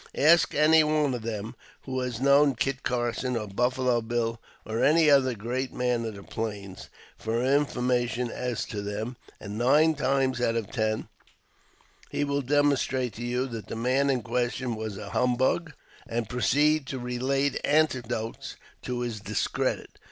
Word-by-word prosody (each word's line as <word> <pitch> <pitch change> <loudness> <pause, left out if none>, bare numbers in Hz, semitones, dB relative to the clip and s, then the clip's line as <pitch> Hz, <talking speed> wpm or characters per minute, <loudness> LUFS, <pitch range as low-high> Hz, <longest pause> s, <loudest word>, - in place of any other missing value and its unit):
Ask 165 +4 +5
any 155 +1 +6
one 150 -3 +1
of 120 - -3
them 110 0 -4 0.3
who 130 -1 -3
has 125 -3 -3
known 140 +1 +4
Kit 135 +2 -1
Carson, 125 0 -1
or 105 -2 -4
Buffalo 125 +3 +1
Bill, 115 0 -2 0.2
or 110 +1 -1
any 155 0 +5
other 130 -3 +4
great 125 +5 -3
man 125 -2 -1
of 110 -2 -5
the 100 - -10
Plains, 100 -4 -6 0.3
for 115 +2 -1
information 125 -3 +1
as 125 -2 -3
to 105 - -5
them, 105 +4 -4 0.2
and 105 +1 -6
nine 150 +6 +4
times 130 -3 0
out 115 -1 +1
of 115 -4 -3
ten 110 -3 -1 1.0
he - - -1
will 140 0 0
demonstrate 135 -3 +1
to 115 - -7
you 125 +2 -1
that 115 -4 -7
the - - -5
man 130 +4 +1
in 130 -4 +1
question 120 +1 -1
was 110 -2 -5
a 100 0 -8
humbug, 130 +6 +1 0.4
and 115 -1 -2
proceed 145 +5 +2
to 135 - -4
relate 130 +3 -1
anecdotes 125 -7 0 0.3
to 125 -1 -3
his 120 -3 -3
discredit. 100 - -2
125 Hz, 160 wpm, -27 LUFS, 115-135 Hz, 1.0 s, any